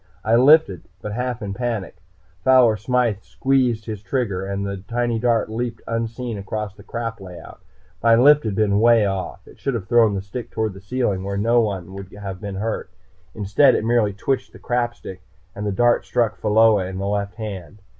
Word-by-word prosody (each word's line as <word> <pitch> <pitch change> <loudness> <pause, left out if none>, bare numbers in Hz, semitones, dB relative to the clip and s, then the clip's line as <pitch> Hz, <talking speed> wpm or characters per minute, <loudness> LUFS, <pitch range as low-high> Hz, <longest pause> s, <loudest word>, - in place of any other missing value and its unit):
I 115 - +3
lifted, 130 - +5
but 105 - -6
half 125 -1 -3
in 100 -1 -4
panic. 115 -6 -3 0.5
Fowler 130 -4 +5
Smythe 115 -1 0
squeezed 125 -2 0
his 110 -3 -6
trigger 100 -3 -2
and 100 0 -3
the 100 0 -4
tiny 120 0 -1
dart 115 -2 +1
leaped 115 +1 -4
unseen 115 0 -3
across 105 0 -4
the 100 - -16
crap 115 0 -5
layout. 90 -2 -11 0.4
My 115 0 +5
lift 145 +5 +6
had 105 -3 -2
been 100 -1 +2
way 115 -1 +5
off 95 -2 -4
it - - -16
should 135 -3 -2
have 100 -5 -5
thrown 115 -2 +4
the 95 - -3
stick 115 +4 -7
toward 110 -2 -2
the 95 - -12
ceiling, 100 -3 -1
where 100 0 -3
no 115 +4 +3
one 95 -4 -3
would 100 -1 -9
have 100 -2 -7
been 100 -2 -5
hurt. 105 -1 -3 0.5
Instead 110 +6 +4
it - - -1
merely 115 -3 +2
twitched 130 +7 -2
the - - -12
crap 120 -1 -1
stick, 95 -1 -10 0.3
and 105 +1 -5
the - - 0
dart 120 +4 +2
struck 115 -3 0
Pheola 105 -1 +3
in 95 0 -6
the 95 - -3
left 100 0 -2
hand. 100 -3 -8
110 Hz, 195 wpm, -21 LUFS, 100-120 Hz, 0.5 s, lift